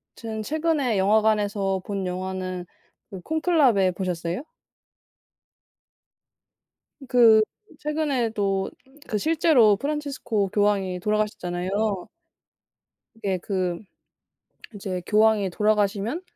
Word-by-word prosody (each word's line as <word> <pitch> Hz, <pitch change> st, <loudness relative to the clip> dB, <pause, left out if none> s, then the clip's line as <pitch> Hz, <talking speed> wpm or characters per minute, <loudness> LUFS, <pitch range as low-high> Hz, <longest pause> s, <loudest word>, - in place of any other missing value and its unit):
지금 220 Hz, -2 st, -5 dB
최근에 305 Hz, -5 st, 0 dB
영화관에서 205 Hz, -1 st, +2 dB
본 195 Hz, -2 st, -3 dB
영화는 185 Hz, 0 st, -4 dB, 0.5 s
어 190 Hz, -, -7 dB
콘클라베 300 Hz, -, +3 dB
보셨어요? 180 Hz, -, -3 dB, 2.6 s
그 225 Hz, -3 st, +6 dB, 0.4 s
최근에도 235 Hz, -11 st, -1 dB, 0.4 s
그 210 Hz, -, -1 dB
실제로 295 Hz, -8 st, +4 dB
프란치스코 275 Hz, -7 st, -2 dB
교황이 195 Hz, -3 st, +1 dB
돌아가셨잖아요. 200 Hz, -1 st, -1 dB, 1.1 s
이게 200 Hz, -5 st, -2 dB
그 180 Hz, -2 st, -2 dB, 1.0 s
이제 190 Hz, -3 st, -4 dB
교황이 215 Hz, -2 st, +3 dB
돌아가시면 210 Hz, -, 0 dB
210 Hz, 220 characters per minute, -24 LUFS, 190-235 Hz, 2.6 s, 그